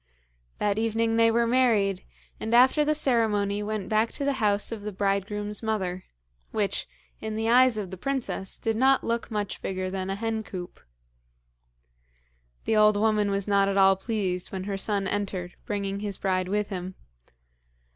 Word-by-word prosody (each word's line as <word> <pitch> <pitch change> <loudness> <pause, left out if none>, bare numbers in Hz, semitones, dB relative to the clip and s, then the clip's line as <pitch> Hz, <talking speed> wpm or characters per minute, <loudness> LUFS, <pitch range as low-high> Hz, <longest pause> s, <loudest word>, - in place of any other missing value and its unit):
That 205 0 0
evening 225 0 +1
they 230 0 +5
were 235 +1 +2
married, 225 -6 +2 0.4
and 225 +2 0
after 260 +5 +6
the 305 +1 +1
ceremony 210 -7 +1
went 210 -2 -3
back 220 +1 +2
to 280 - -4
the 280 - +2
house 205 0 +2
of 225 -2 -5
the 210 +1 -5
bridegroom's 205 +1 -2
mother, 190 -5 -2 0.4
which, 205 -2 -1 0.3
in 220 0 -4
the 220 +1 -1
eyes 250 -1 +5
of 195 -3 -4
the 190 - -6
princess, 250 -4 -3
did 225 -1 -1
not 265 +3 +3
look 235 0 -2
much 210 -3 -3
bigger 185 -1 -3
than 190 0 -3
a 195 - -1
hen 225 +1 -2
coop. 185 -4 -8 1.9
The 220 - +1
old 215 -1 +5
woman 210 -1 +2
was 200 0 -1
not 200 -1 +3
at 200 - -1
all 195 0 +6
pleased 190 -3 -2
when 190 -1 -4
her 200 0 -3
son 200 0 -1
entered 190 -3 -3
bringing 200 -1 -2
his 205 -2 -4
bride 185 -2 0
with 205 +2 -1
him. 185 -1 -5
210 Hz, 170 wpm, -26 LUFS, 195-225 Hz, 1.9 s, after